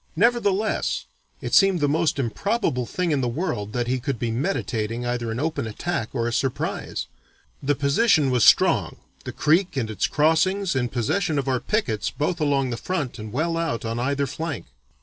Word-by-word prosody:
Nevertheless, 220 -3 +1 0.4
it - - -5
seemed 195 -3 +5
the 145 - +2
most 160 +2 +1
improbable 130 - -1
thing 180 -2 -1
in 145 -3 +1
the 125 - 0
world 120 - -2
that 120 -1 0
he 130 +2 0
could 135 0 -2
be 115 0 -2
meditating 120 - -2
either 120 -1 -2
an 115 +1 -3
open 145 -4 -1
attack 115 +2 -3
or 120 -3 -1
a 120 - -2
surprise. 130 +1 -2 0.6
The 145 +1 +1
position 145 - +3
was 125 -3 +3
strong, - - +4 0.3
the - - -4
creek 165 +2 +2
and 115 -4 -1
its 105 - 0
crossings 165 +4 +2
in 125 -2 0
possession 155 - 0
of 140 -1 -1
our 130 -2 +1
pickets 120 - -1
both 160 +7 -2
along 140 -3 +1
the 120 - -3
front 145 -9 -3
and 110 0 -7
well 165 +7 0
out 165 -9 -2
on 115 +1 -2
either 140 +3 0
flank." 155 0 -4
140 Hz, 185 wpm, -24 LUFS, 120-170 Hz, 0.6 s, seemed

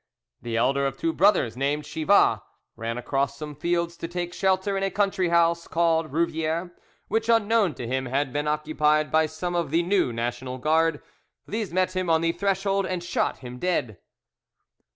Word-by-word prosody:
The 115 -1 -3
elder 135 +4 +2
of 135 - -5
two 330 0 -1
brothers 190 - +3
named 140 +3 -1
Chivas 160 +6 +3 0.4
ran 115 +1 -4
across 140 +3 -1
some 150 0 -6
fields 170 +3 -1
to 165 - -5
take 175 0 -4
shelter 190 +1 +1
in 195 - -1
a 195 - +1
country 195 -2 0
house 170 0 +2
called 165 -2 +1
Rouviere, 165 +2 -1 0.4
which, 225 +2 -1
unknown 225 - +3
to 120 - -6
him, 130 +2 -2
had 135 +1 -1
been 145 +1 -1
occupied 150 0 +1
by 160 0 +3
some 165 +3 -4
of 170 -4 -1
the 165 +4 +2
new 180 -7 +1
National 120 +2 -4
Guard. 160 +3 +1 0.4
These 215 -1 -3
met 185 +1 0
him 185 -2 -1
on 160 -1 +3
the 165 0 +2
threshold 195 +2 0
and 180 -2 -3
shot 175 - -1
him 125 0 -8
dead. 125 - -1
165 Hz, 175 wpm, -25 LUFS, 140-185 Hz, 0.4 s, brothers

